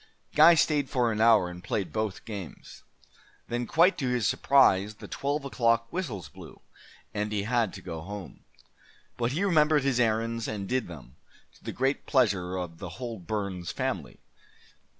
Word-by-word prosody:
'" - - -43
Guy 170 +1 +8
stayed 150 -3 +2
for 120 -3 +1
an 110 0 -1
hour, 110 -5 +5
and 90 0 -9
played 95 +1 -3
both 110 -3 -3
games. 100 -6 -9 0.7
Then, 120 0 -3
quite 175 +5 +4
to 130 -4 -1
his 125 -3 0
surprise, 105 -7 +3
the - - -11
twelve 140 +1 -2
o'clock 115 -3 +1
whistles 120 - -4
blew, 70 - -13 0.5
and 105 0 -2
he 105 -2 -1
had 115 -2 +1
to 95 - -10
go 80 -1 -6
home. 100 +1 -9 0.7
But 120 +1 -1
he 170 +7 0
remembered 155 -6 +3
his 135 -3 +1
errands 115 0 0
and 100 -3 -4
did 130 +3 -1
them, 70 -8 -12 0.4
to - - -24
the - - -4
great 135 +2 -1
pleasure 100 -9 +1
of 90 -3 -5
the 90 -4 -8
whole 120 -4 -5
Burns 95 -2 -4
family. - - -4
115 Hz, 170 wpm, -28 LUFS, 95-130 Hz, 0.7 s, Guy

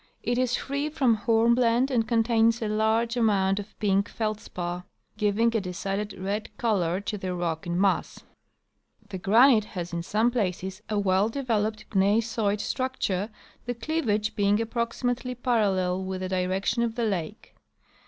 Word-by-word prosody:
It 245 +1 0
is 255 -1 +1
free 280 +2 -2
from 270 -6 +2
hornblende 235 +3 +3
and 230 -3 +1
contains 230 0 +3
a 220 - -2
large 220 +2 +1
amount 200 -4 +2
of 205 +1 -9
pink 200 0 +1
feldspar, 180 -5 -4 0.2
' - - -44
giving 225 +2 +2
a 225 - +2
decided 195 +3 -3
red 200 +3 -3
color 185 -6 +1
to 205 0 -4
the 185 -1 -3
rock 170 -2 -3
in 175 +1 -1
mass. 195 -1 0 0.9
The 190 - -5
granite 225 +3 +5
has 175 -1 -4
in 170 - -1
some 215 +7 +1
places 190 -3 -2
a 210 - 0
well 200 +1 +2
developed 220 -4 -2
gneissoid 210 +1 +1
structure, 220 -6 -2 0.4
the 245 - -2
cleavage 225 -5 -1
being 205 0 +2
approximately 245 +2 -2
parallel 195 -7 +1
with 190 0 -4
the 185 - -3
direction 190 +4 0
of 230 -1 -1
the 235 -2 0
lake. 200 0 -4
215 Hz, 155 wpm, -26 LUFS, 190-235 Hz, 0.9 s, granite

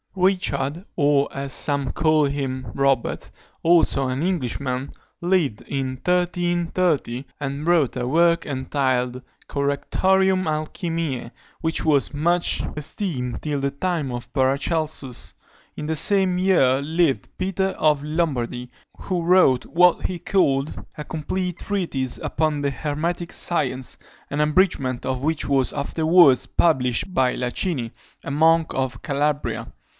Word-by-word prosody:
Richard, 180 -5 0
or, 145 -2 +3
as 135 -1 -5
some 140 -3 +1
call 155 -2 +3
him, 135 -3 -3
Robert, 135 -3 0 0.3
also 165 -5 +4
an 130 +4 -2
Englishman, 135 -6 -2 0.3
lived 170 - +1
in 135 -1 -3
1330, 175 -3 0 0.2
and 140 +1 -4
wrote 165 -8 +2
a 125 - -2
work 170 +4 +3
entitled 130 -2 -1 0.3
Correctorium 185 +7 +1
Alchymiæ, 155 -4 -3 0.3
which 160 -1 -1
was 145 -2 +2
much 170 +4 +2
esteemed 145 - -3
till 145 -2 -2
the 140 0 0
time 155 -2 -2
of 120 0 -7
Paracelsus. 140 0 -1 0.4
In 150 - -4
the 160 +1 -1
same 190 +2 +2
year 140 -9 +3
lived 155 - 0
Peter 190 +1 0
of 150 -2 +2
Lombardy, 135 -6 -2 0.3
who 180 -3 -3
wrote 170 -7 +4
what 180 +1 +3
he 180 -2 -5
called 150 -7 0
a 150 - -6
Complete 180 +3 -3
Treatise 165 - -2
upon 155 -2 -1
the 140 -1 0
Hermetic 160 +6 -3
Science, 130 -7 -1 0.3
an 145 +1 0
abridgment 150 -6 +1
of 130 0 -2
which 160 0 0
was 135 -2 +2
afterwards 155 -2 +4
published 130 +1 +1
by 130 -4 +2
Lacini, 125 - -2 0.3
a - - -4
monk 160 +2 +3
of 130 -3 -2
Calabria. 145 0 -1
150 Hz, 125 wpm, -23 LUFS, 135-170 Hz, 0.4 s, also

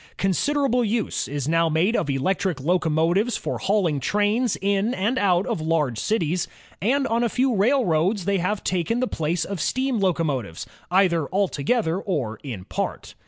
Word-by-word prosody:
Considerable 250 - +1
use 220 0 -1
is 145 -1 -3
now 165 +1 +2
made 170 +9 +2
of 145 - 0
electric 175 +5 0
locomotives 170 - +1
for - - -4
hauling 185 -8 +1
trains 210 - +1
in 200 +4 0
and 225 +7 0
out 185 -1 +2
of - - -2
large 155 -8 0
cities, 175 - 0 0.3
and 270 +7 +2
on 230 0 +1
a 235 - +1
few 255 +3 +1
railroads 200 - +2
they 200 -1 +1
have 195 +4 -1
taken 185 +6 0
the 255 - +1
place 160 -1 -1
of 195 -5 -4
steam 260 - 0
locomotives, 150 - -1 0.2
either 175 -5 +2
altogether 190 - 0
or 130 - -3
in 115 -10 -7
part. - - -4
185 Hz, 160 wpm, -23 LUFS, 160-220 Hz, 0.3 s, now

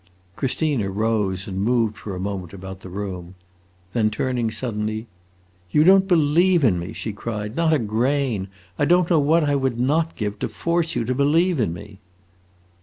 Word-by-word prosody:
Christina 135 -5 0
rose 100 -2 -1
and 95 -1 -3
moved 115 -1 +1
for 100 -3 -7
a - - -5
moment 95 -2 -4
about 95 0 -8
the 95 - -10
room. 95 -2 -6 0.6
Then 110 -2 +2
turning 120 +1 -1
suddenly, 110 -2 -3 0.6
"You 150 +11 +4
don't 190 +2 +6
believe 170 0 +3
in 95 -9 +3
me!" 85 +4 -6
she 110 -1 -5
cried; 105 +1 -5
"not 165 0 +2
a 155 - +4
grain! 120 -2 0 0.3
I - - +3
don't 175 +2 +3
know 165 - +5
what 155 +3 +3
I 145 -1 +1
would 130 -4 -1
not 155 +6 +1
give 105 -1 -4
to - - -2
force 170 -1 -1
you 120 -2 0
to 130 - 0
believe 155 +5 +2
in 110 -8 +1
me!" 90 +4 -10
115 Hz, 180 wpm, -22 LUFS, 100-150 Hz, 0.6 s, don't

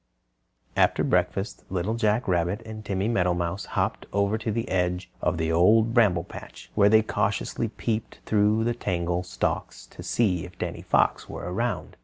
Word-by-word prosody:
After - - +3
breakfast 95 +3 0
Little 95 +4 -1
Jack 110 0 +1
Rabbit 90 +3 +1
and 110 -1 -8
Timmy 100 0 -1
Meadowmouse 90 -3 0
hopped - - -1
over 100 +1 +1
to 110 0 -2
the 115 +2 -2
edge 90 0 -1
of 90 - 0
the 80 0 0
Old 110 +7 +4
Bramble 100 -8 +4
Patch, - - -11
where 100 -1 +5
they 110 +1 +6
cautiously - - -1
peeped 110 0 -3
through 105 +1 +3
the 120 +1 +1
tangled 90 -5 -2
stalks 90 - -2
to - - -12
see 95 -8 +1
if 90 0 -11
Danny - - -4
Fox - - +1
were - - -6
around. 105 +7 -3
100 Hz, 165 wpm, -26 LUFS, 90-110 Hz, -, they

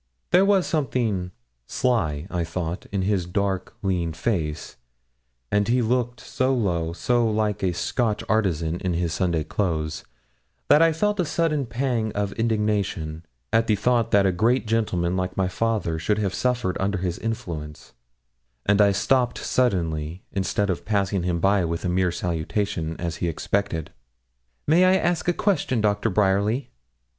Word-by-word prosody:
There 185 +2 +6
was 195 -2 +3
something 120 - -1 0.4
sly, 80 - 0
I 90 -1 -1
thought, 85 +2 -4
in 100 -2 -1
his 95 -3 0
dark, 95 0 -2
lean 90 -4 0
face; 80 -4 -2 0.7
and 105 0 +2
he 120 +1 +2
looked 120 +1 0
so 130 +1 0
low, 85 -8 0
so 120 +7 +1
like 105 -1 0
a 95 - +1
Scotch 105 +5 -1
artisan 85 -6 0
in 90 -2 -1
his 85 -1 -1
Sunday 85 -3 0
clothes, 80 -4 -2 0.7
that 150 - +7
I 165 0 +6
felt 210 +5 0
a - - +4
sudden 150 -4 0
pang 115 -3 -1
of 100 -1 -1
indignation, 105 -8 -1 0.3
at 115 0 +3
the 110 - +3
thought 115 +2 +1
that 100 -3 +4
a 95 - +4
great 115 +8 +2
gentleman, 95 -6 0
like 90 0 -2
my 95 -1 +2
father, 100 -5 -1
should 105 +6 0
have 100 -3 -1
suffered 125 -7 0
under 100 +1 0
his 90 -1 -3
influence, 85 -10 -5 0.7
and 105 +1 +4
I 100 -1 +5
stopped 125 +4 +1
suddenly, 85 -8 -1
instead 100 +1 0
of 90 - -4
passing 100 -3 0
him 85 -1 -1
by 95 +1 +3
with 85 +2 -2
a - - +1
mere 90 0 +1
salutation, 85 0 -2
as 85 -1 -3
he 85 - -1
expected, 85 -1 -2 0.8
'May 165 +5 +5
I 185 +1 +5
ask 175 -2 0
a - - +5
question, 175 - 0
Doctor 105 +1 +1
Bryerly?' 105 +5 +1
100 Hz, 160 wpm, -24 LUFS, 85-115 Hz, 0.8 s, that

